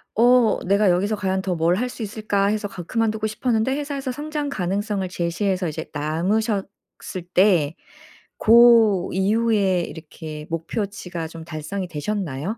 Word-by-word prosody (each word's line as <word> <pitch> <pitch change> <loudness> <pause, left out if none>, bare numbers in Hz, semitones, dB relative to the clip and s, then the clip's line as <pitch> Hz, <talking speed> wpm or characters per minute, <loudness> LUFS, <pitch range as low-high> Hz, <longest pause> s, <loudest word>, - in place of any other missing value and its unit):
어 240 0 +4
'내가 200 +1 +3
여기서 200 +5 +1
과연 190 -1 -1
더 185 -2 -2
뭘 165 +2 +2
할 250 +5 -1
수 240 -2 -7
있을까?' 205 -1 -1
해서 210 0 -1
가 180 -3 -8
그만두고 220 +2 -1
싶었는데 225 +3 0
회사에서 280 -3 -3
성장 295 +1 -4
가능성을 195 -2 -2
제시해서 180 +1 -1
이제 160 +1 -6
남으셨을 190 +8 0 0.7
때 175 -6 +3 0.6
고 225 -5 +6
이후에 200 -2 +2
이렇게 155 -2 -8
목표치가 175 0 -4
좀 165 -1 -10
달성이 170 +4 -5
되셨나요? 175 - -3
200 Hz, 315 characters per minute, -22 LUFS, 175-220 Hz, 0.7 s, 고